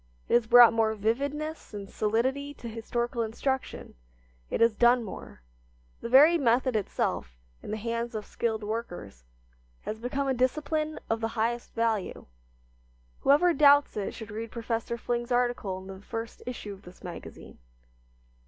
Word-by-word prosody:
It - - -2
has 240 -2 +4
brought 240 0 +8
more 220 -1 +2
vividness 280 +6 -2
and 200 -1 -6
solidity 260 +8 -1
to 240 - -9
historical 235 +2 -3
instruction. 265 +4 -3 0.6
It - - -2
has 230 -1 +5
done 240 +2 +4
more. 190 - -9 0.6
The 235 - -5
very 300 +7 +7
method 250 -1 +2
itself, 60 - -2 0.2
in - - -9
the 215 - -2
hands 230 +1 -3
of 210 -1 -4
skilled 220 -2 -2
workers, 175 - -6 0.6
has 220 - -5
become 270 +4 -2
a 265 - +2
discipline 305 +5 -1
of 225 0 -1
the 225 - +1
highest 235 +2 -1
value. 225 -4 -1 0.9
Whoever 305 +6 +4
doubts 285 0 +5
it 205 -2 -3
should 220 -2 -8
read 225 +2 -5
Professor 230 0 -3
Fling's 240 +1 -3
article 245 -6 0
in 190 - -10
the 190 0 -9
first 225 +2 -6
issue 220 -4 -5
of 195 - -13
this 180 -1 -15
magazine. 175 -2 -10
230 Hz, 155 wpm, -28 LUFS, 220-255 Hz, 0.9 s, brought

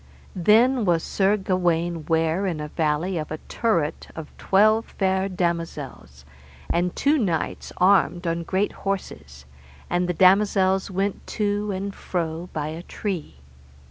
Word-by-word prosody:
Then 225 +7 +4
was 170 -4 +2
Sir 200 +1 +1
Gawaine 175 -4 -1
ware 165 +4 +1
in 165 -4 -2
a 150 0 -5
valley 160 +3 -1
by 155 - -6
a - - -9
turret 170 -10 -1
[of] 160 -2 -9
twelve 215 +3 +3
fair 190 0 +1
damosels, 165 - -4 0.5
and 175 +1 0
two 290 +2 +2
knights 175 -9 -2
armed 185 -1 +3
on 170 0 -1
great 190 +4 -1
horses, 75 - -5 0.5
and 180 0 +1
the 180 - -1
damosels 190 +1 +3
went 195 +1 -2
to 205 0 0
and 195 +1 -4
fro 170 -1 -4
by 150 -1 -3
a 160 +2 -6
tree. 170 - -5
180 Hz, 140 wpm, -24 LUFS, 165-195 Hz, 0.5 s, Then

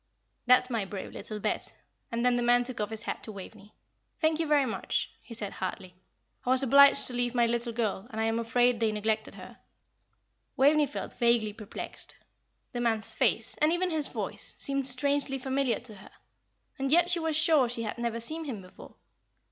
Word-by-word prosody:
"That's 250 +1 +5
my 225 -3 0
brave 195 0 -7
little 215 -1 -7
Bet." - - -3 0.4
And 235 +1 -1
then 250 0 +4
the 245 - 0
man 245 0 +4
took 245 0 -4
off 210 - -2
his 220 -1 -6
hat - - -4
to 220 - -6
Waveney. 205 +1 -11 0.4
"Thank 315 -1 +2
you, 325 - 0
very 295 -2 +4
much," 225 - -2
he 230 - -10
said, 205 -3 -4
heartily. 185 0 -5 0.5
"I - - -3
was 260 +1 +4
obliged 280 +2 +6
to 250 - 0
leave 245 0 -1
my 240 -1 +4
little 235 0 -1
girl, 225 -3 -2
and 220 - -6
I - - +1
am 225 +1 0
afraid 240 +1 +2
they 225 -1 +2
neglected 215 +1 -2
her." - - -12 1.0
Waveney 295 +2 +4
felt 280 - -6
vaguely 235 -3 +2
perplexed. 215 -1 -7 0.6
The 240 - -3
man's 225 -2 +1
face, - - +1
and 305 +1 +4
even 360 +1 0
his 310 -3 +2
voice, - - -5
seemed 275 -1 0
strangely 275 +1 +1
familiar 265 -1 0
to 235 -2 -6
her, 195 -1 -14 0.7
and 270 0 -1
yet 345 +2 +5
she 350 - +5
was 320 -1 -1
sure 315 -5 +4
she 235 -1 -2
had 220 +2 -5
never 235 -1 -2
seen 315 +8 -3
him 225 -9 -6
before. 185 - -14
245 Hz, 195 wpm, -29 LUFS, 220-275 Hz, 1.0 s, obliged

